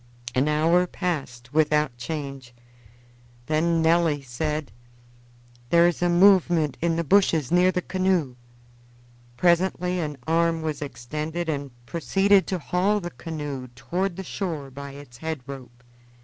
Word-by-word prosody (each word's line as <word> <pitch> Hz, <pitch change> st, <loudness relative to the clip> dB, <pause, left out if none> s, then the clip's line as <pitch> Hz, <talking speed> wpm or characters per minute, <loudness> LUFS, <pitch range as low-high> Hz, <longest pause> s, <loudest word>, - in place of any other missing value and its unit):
An 130 Hz, +3 st, +2 dB
hour 165 Hz, +4 st, +3 dB
passed 135 Hz, -10 st, -4 dB
without 150 Hz, -3 st, +2 dB
change. 135 Hz, -1 st, -6 dB, 0.9 s
Then 165 Hz, +2 st, +1 dB
Nelly 160 Hz, -3 st, +3 dB
said: 150 Hz, +3 st, -3 dB, 1.0 s
"There 170 Hz, 0 st, +6 dB
is 175 Hz, -, -1 dB
a 175 Hz, -, +3 dB
movement 175 Hz, -5 st, +4 dB
in 170 Hz, 0 st, +1 dB
the 170 Hz, -, 0 dB
bushes 165 Hz, -5 st, +3 dB
near 180 Hz, +1 st, +5 dB
the 180 Hz, -1 st, -2 dB
canoe." 185 Hz, -8 st, 0 dB, 1.0 s
Presently 180 Hz, +2 st, +2 dB
an 150 Hz, -4 st, -3 dB
arm 165 Hz, 0 st, +1 dB
was 155 Hz, -2 st, -3 dB
extended 155 Hz, +5 st, -4 dB
and 140 Hz, -2 st, -2 dB, 0.2 s
proceeded 195 Hz, +7 st, +2 dB
to 185 Hz, -, -1 dB
haul 185 Hz, +5 st, +1 dB
the 175 Hz, -2 st, -6 dB
canoe 145 Hz, -2 st, -6 dB
toward 180 Hz, +7 st, -2 dB
the 190 Hz, -, -6 dB
shore 160 Hz, -8 st, -4 dB
by 140 Hz, +1 st, -8 dB
its 140 Hz, -4 st, -12 dB
head 160 Hz, 0 st, -4 dB
rope. 125 Hz, -3 st, -10 dB
160 Hz, 135 wpm, -25 LUFS, 140-175 Hz, 1.0 s, There